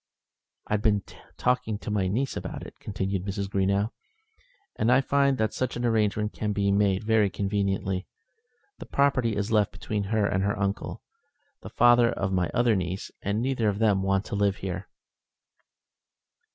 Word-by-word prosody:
"I've 105 -1 0
been 105 -2 +2 0.3
talking 125 -4 0
to 105 - -6
my 100 -3 +1
niece 125 +9 -1
about - - -5
it," - - -10
continued 95 -1 -3
Mrs. 100 0 -3
Greenow, 100 +2 +1 0.8
"and 115 - +2
I 130 - +6
find 140 0 +2
that 110 -2 0
such 130 -2 -2
an 120 - -2
arrangement 105 -2 +1
can 105 -1 -2
be 100 0 +1
made 100 0 +2
very 110 -2 +3
conveniently. 95 -1 -1 0.7
The - - -9
property 130 -6 +2
is 105 +2 -2
left 105 -2 +3
between 105 -2 -3
her 105 +1 +1
and 95 -1 0
her 100 +1 0
uncle, 100 0 -3 0.6
the - - -8
father 120 -1 +5
of 95 -4 -2
my 90 -2 +1
other 120 -2 +3
niece, 95 +1 -3
and 105 +3 -1
neither 125 -5 +1
of 100 - -2
them 105 -3 +3
want 95 0 +1
to - - -4
live 100 -1 +2
here." 95 -2 -5
105 Hz, 165 wpm, -27 LUFS, 100-115 Hz, 0.8 s, I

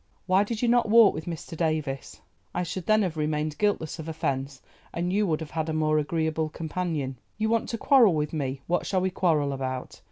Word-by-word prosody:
Why 190 +2 +4
did 225 +2 -4
you - - +3
not 235 -2 +3
walk 225 -2 +7
with 155 - -6
Mr. 165 -1 -6
Davies? 155 -5 -2 0.3
I 180 - 0
should 180 0 -5
then 215 0 +4
have 170 -4 -2
remained 150 0 -1
guiltless 200 -7 0
of 160 0 -6
offence, 135 -3 -3 0.3
and 175 +2 -2
you 205 0 +2
would 160 -2 0
have 160 - -7
had 160 0 -2
a - - -1
more 155 -1 +2
agreeable 160 0 -1
companion. 155 -5 -3 0.2
You 220 +1 0
want 230 0 +1
to 230 - -2
quarrel 235 - +5
with 150 0 -1
me; 135 -3 -3
what 175 +1 0
shall 190 -2 +1
we 190 0 0
quarrel 155 -6 +1
about? 130 -1 -5
160 Hz, 215 wpm, -27 LUFS, 150-190 Hz, 0.3 s, walk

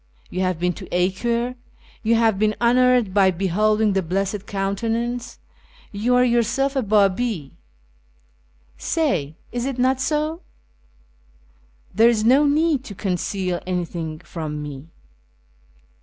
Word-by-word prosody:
You 185 - -3
have 185 -2 0
been 180 +1 0
to - - -10
Acre, 235 +7 0 0.5
you 230 0 +2
have 225 -3 +2
been 215 0 +2
honoured 245 -3 +3
by 195 -1 +5
beholding 205 +4 +1
the 195 - +1
Blessed 195 +3 -2
Countenance, 230 +5 -2 0.5
you 225 +5 +1
are 250 - +5
yourself 250 +4 +1
a 265 - +2
Babi. 200 - +1 1.3
Say, 170 - -1 0.2
is 240 +1 -3
it 270 -2 -3
not 260 +1 +2
so? 310 +4 -1 1.5
There 225 +4 +5
is 220 -3 +1
no 275 +5 +5
need 300 -1 +2
to 200 - -8
conceal 185 -1 -2
anything 170 -3 -3
from 155 -3 -6
me." 145 0 -8
215 Hz, 125 wpm, -22 LUFS, 185-245 Hz, 1.5 s, by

